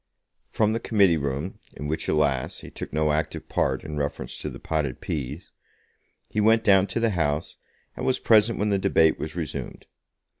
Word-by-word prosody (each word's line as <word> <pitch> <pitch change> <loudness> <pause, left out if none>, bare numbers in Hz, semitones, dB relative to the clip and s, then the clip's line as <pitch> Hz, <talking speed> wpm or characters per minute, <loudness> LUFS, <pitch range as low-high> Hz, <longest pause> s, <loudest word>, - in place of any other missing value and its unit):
From 110 -1 +1
the 115 - 0
Committee 100 -8 +3
Room, 70 +5 -3 0.2
in 75 - -6
which, 75 +2 -2
alas! 70 -4 0
he - - -10
took - - -7
no 75 0 +1
active 75 +1 -2
part - - 0
in 75 -1 -6
reference 70 0 -3
to - - -4
the - - -8
potted 75 -5 -2
peas, 75 +2 -5 0.8
he 105 - -1
went 110 +1 +4
down 95 -2 +5
to 115 - -2
the 115 -1 +2
House, 80 -4 -1 0.4
and - - -6
was 130 - +2
present 110 0 +4
when 105 +1 0
the 100 -1 +2
debate 80 -4 +3
was 80 0 -5
resumed. 85 -3 -5
80 Hz, 185 wpm, -25 LUFS, 75-105 Hz, 0.8 s, down